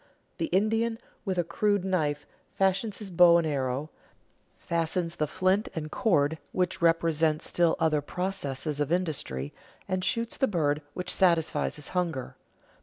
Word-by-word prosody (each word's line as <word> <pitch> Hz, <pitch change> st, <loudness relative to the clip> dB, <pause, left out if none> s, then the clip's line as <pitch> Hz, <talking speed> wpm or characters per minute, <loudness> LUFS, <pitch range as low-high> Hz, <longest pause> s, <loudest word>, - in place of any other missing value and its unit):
The 325 Hz, -, 0 dB
Indian 225 Hz, 0 st, +1 dB, 0.3 s
with 190 Hz, -2 st, -1 dB
a 175 Hz, -, +2 dB
crude 205 Hz, +2 st, 0 dB
knife 150 Hz, -6 st, 0 dB, 0.3 s
fashions 195 Hz, +2 st, +1 dB
his 205 Hz, -3 st, -8 dB
bow 175 Hz, -1 st, +7 dB
and 170 Hz, -, +1 dB
arrow, 140 Hz, 0 st, -2 dB, 0.7 s
fastens 170 Hz, +1 st, -1 dB
the 155 Hz, -, 0 dB
flint 190 Hz, -, +1 dB
and 155 Hz, -1 st, -4 dB
cord 160 Hz, -7 st, +2 dB
which 180 Hz, 0 st, -1 dB
represent 165 Hz, -2 st, +2 dB
still 170 Hz, -2 st, +2 dB
other 155 Hz, -2 st, +2 dB
processes 150 Hz, -4 st, -3 dB
of 145 Hz, +1 st, -1 dB
industry, 145 Hz, -, -2 dB, 0.3 s
and 185 Hz, 0 st, -1 dB
shoots 230 Hz, +4 st, -1 dB
the 265 Hz, -, +2 dB
bird 150 Hz, -, 0 dB
which 180 Hz, 0 st, -2 dB
satisfies 170 Hz, -4 st, +2 dB
his 150 Hz, -, -7 dB
hunger. 170 Hz, -8 st, -2 dB
170 Hz, 145 wpm, -28 LUFS, 155-190 Hz, 0.7 s, bow